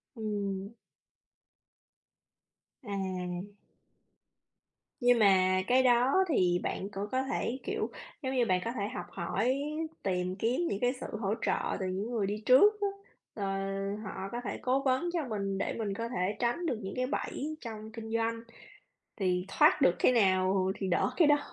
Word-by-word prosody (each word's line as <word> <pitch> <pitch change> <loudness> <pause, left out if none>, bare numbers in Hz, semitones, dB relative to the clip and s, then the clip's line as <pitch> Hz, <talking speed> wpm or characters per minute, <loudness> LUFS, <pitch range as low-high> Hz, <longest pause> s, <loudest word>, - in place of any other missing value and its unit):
Ừm. 205 -2 -3 2.1
À. 185 -1 -4 1.5
Nhưng 245 -1 +5
mà 185 -2 +5
cái 255 +1 +4
đó 255 +9 +4
thì 180 - +3
bạn 195 - -3
cũng 200 +1 -4
có 260 +1 +1
thể 265 -1 -2
kiểu, 425 +2 -2 0.3
giống 265 -1 -2
như 245 -2 +3
bạn 185 -3 +2
có 230 - -1
thể 205 -4 -2
học - - -5
hỏi, 235 +10 0 0.4
tìm 180 -1 -1
kiếm 235 - 0
những 200 - -2
cái 245 +1 +2
sự - - -4
hỗ 205 -1 0
trợ - - 0
từ 190 - -2
những 195 +6 -3
người 220 -4 0
đi 210 +2 -3
trước 410 +12 +6
á. 405 - +2 0.5
Ờ, 200 -2 -3 0.6
họ 195 -1 -5
có 240 - -3
thể - - -3
cố 260 +2 +1
vấn 270 +6 +1
cho 325 -6 -1
mình 195 -3 -2
để - - -1
mình 210 -3 -2
có 230 +3 -3
thể 205 -3 -1
tránh 240 +9 0
được 300 - 0
những 190 0 -5
cái 255 0 0
bẫy 305 +2 -3
trong 220 -2 -7
kinh 220 -1 -7
doanh. 230 0 0 0.8
Thì 180 -3 0
thoát - - +5
được 175 - +5
cái 255 - +4
nào 190 -3 +3
thì 195 - -3
đỡ 175 - +2
cái 325 -4 +5
đó. 295 0 +6
220 Hz, 170 wpm, -31 LUFS, 190-255 Hz, 2.1 s, trước